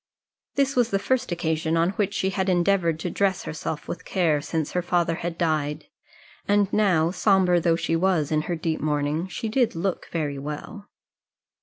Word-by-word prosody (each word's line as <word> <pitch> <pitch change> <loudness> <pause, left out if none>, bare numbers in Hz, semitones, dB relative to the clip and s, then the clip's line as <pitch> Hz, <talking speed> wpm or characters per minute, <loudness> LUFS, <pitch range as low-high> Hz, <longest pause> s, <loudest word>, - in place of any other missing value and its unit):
This 275 0 +1
was 245 -2 +3
the 195 - +1
first 255 +3 0
occasion 160 -1 0
on 170 +2 +2
which 200 0 -1
she 190 -1 0
had 190 0 -1
endeavoured 175 -2 +2
to 175 - -2
dress 195 -1 0
herself 155 -1 -5
with - - -5
care 165 -6 +1
since 155 0 -2
her 180 - 0
father 175 -1 +1
had 170 0 -4
died; 155 -3 -1 0.6
and 205 -1 +2
now, 180 -6 +3
sombre 185 -2 +3
though 170 -1 +2
she 165 0 -1
was 165 -4 +1
in 155 -1 +2
her 175 - 0
deep 160 -1 -2
mourning, 150 +3 0
she 190 +5 -4
did 235 -1 +1
look 180 +2 -2
very 145 -4 -2
well. 150 +9 -7
175 Hz, 180 wpm, -25 LUFS, 160-195 Hz, 0.6 s, was